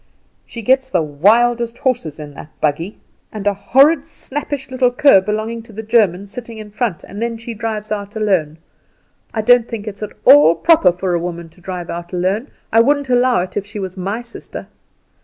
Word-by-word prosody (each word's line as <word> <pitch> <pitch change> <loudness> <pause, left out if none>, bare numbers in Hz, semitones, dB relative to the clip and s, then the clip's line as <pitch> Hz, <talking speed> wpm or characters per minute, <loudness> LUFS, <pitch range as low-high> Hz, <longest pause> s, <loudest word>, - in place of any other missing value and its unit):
"She 230 - -8
gets 260 +3 +2
the 180 -9 +1
wildest 230 +10 +2
horses 240 - -2
in 145 -1 -8
that 145 - -11
buggy, 165 +7 -1 0.3
and 210 -2 -7
a 205 - +3
horrid 275 +10 +3
snappish 275 -1 -5
little 255 -1 +2
cur 250 -5 +5
belonging 215 +3 -3
to 230 +1 -16
the 220 +2 -6
German 205 -4 +2
sitting 230 +2 -9
in 215 -1 -9
front, 215 -5 -2
and 200 +3 -9
then 235 0 -2
she 230 +1 -7
drives 215 -1 -4
out 205 0 -4
alone. 185 -8 0 0.7
I 220 - -2
don't 245 +1 +5
think 220 -2 -6
it's 200 0 -7
at 210 - -5
all 155 +3 +7
proper 310 - +4
for 180 +1 -3
a 170 - +1
woman 170 -1 -6
to 165 +3 -23
drive 180 -1 -6
out 175 +1 -7
alone; 190 +8 -1 0.3
I 225 - +6
wouldn't 285 +1 +1
allow 245 -4 +3
it 180 - -6
if 205 - -1
she 210 +1 -9
was 190 -2 -5
my 200 +5 -4
sister. 235 - -9
215 Hz, 195 wpm, -18 LUFS, 180-240 Hz, 0.7 s, all